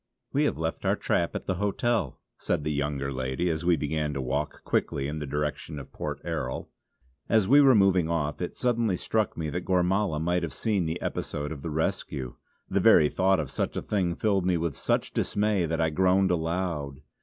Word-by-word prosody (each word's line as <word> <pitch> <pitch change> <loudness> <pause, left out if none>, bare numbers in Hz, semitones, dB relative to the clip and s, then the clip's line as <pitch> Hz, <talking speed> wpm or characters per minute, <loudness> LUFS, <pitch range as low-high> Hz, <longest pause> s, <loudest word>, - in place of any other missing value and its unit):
"We - - +3
have - - 0
left 80 +1 -3
our - - +2
trap - - 0
at - - -4
the 95 - -1
hotel" 105 - 0 0.2
said 75 - -1
the 75 - -1
younger 70 -1 -2
lady 65 +7 -1
as 80 0 -3
we 85 0 +4
began 75 0 -2
to - - -2
walk 70 +4 -3
quickly 70 -1 0
in 75 +2 -4
the 75 - -5
direction 75 +2 -3
of 70 - -9
Port 75 -2 -4
Erroll. 80 -7 -3 0.6
As 110 -4 +3
we 145 +4 +7
were 135 -3 +6
moving 95 -5 +4
off 75 -2 -1
it 90 - -3
suddenly 115 -5 +1
struck 110 +2 -1
me 80 -2 -3
that 90 +3 -3
Gormala 90 -2 +1
might 90 +2 +1
have 85 -5 -4
seen 100 -7 0
the 80 +2 -2
episode 75 +1 -3
of 75 -3 -6
the 80 - -4
rescue. 70 -4 -2 0.3
The - - +1
very 75 - +6
thought 95 0 +2
of 75 -4 -3
such - - -2
a - - -1
thing 90 -5 0
filled 100 -2 +1
me 90 -1 +2
with 80 -3 -2
such - - -1
dismay 100 -4 +1
that 80 +1 -2
I 80 -1 +2
groaned 95 +3 +3
aloud. 80 -4 -2
80 Hz, 205 wpm, -27 LUFS, 75-95 Hz, 0.6 s, we